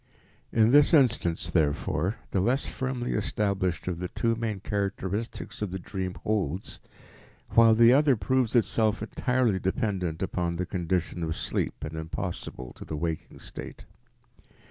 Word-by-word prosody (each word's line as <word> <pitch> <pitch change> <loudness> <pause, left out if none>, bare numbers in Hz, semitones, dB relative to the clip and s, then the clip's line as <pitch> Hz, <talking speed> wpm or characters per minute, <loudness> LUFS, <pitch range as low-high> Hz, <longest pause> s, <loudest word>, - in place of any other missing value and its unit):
In 110 0 +4
this 145 +4 +6
instance, 115 - +2
therefore, 80 +4 +1 0.2
the 95 - +1
less 120 +8 +1
firmly 130 -2 -3
established 100 -4 -1
of 90 -2 -2
the 90 - -2
two 115 +6 0
main 110 -3 -3
characteristics 100 +3 -3
of 105 - -1
the 95 - -4
dream 95 0 -4
holds, 95 -4 -2 0.7
while 115 -1 +6
the 115 +2 +7
other 140 -1 +5
proves 120 +4 0
itself 110 -2 +2
entirely 125 -3 +1
dependent 95 -4 -1
upon 85 -2 -1
the 90 +2 -2
condition 90 -1 -2
of 80 -1 -2
sleep - - -2
and 80 +1 -5
impossible 80 -5 -5
to - - -8
the 75 - -5
waking 80 0 -4
state. - - -9
100 Hz, 145 wpm, -28 LUFS, 90-115 Hz, 0.7 s, the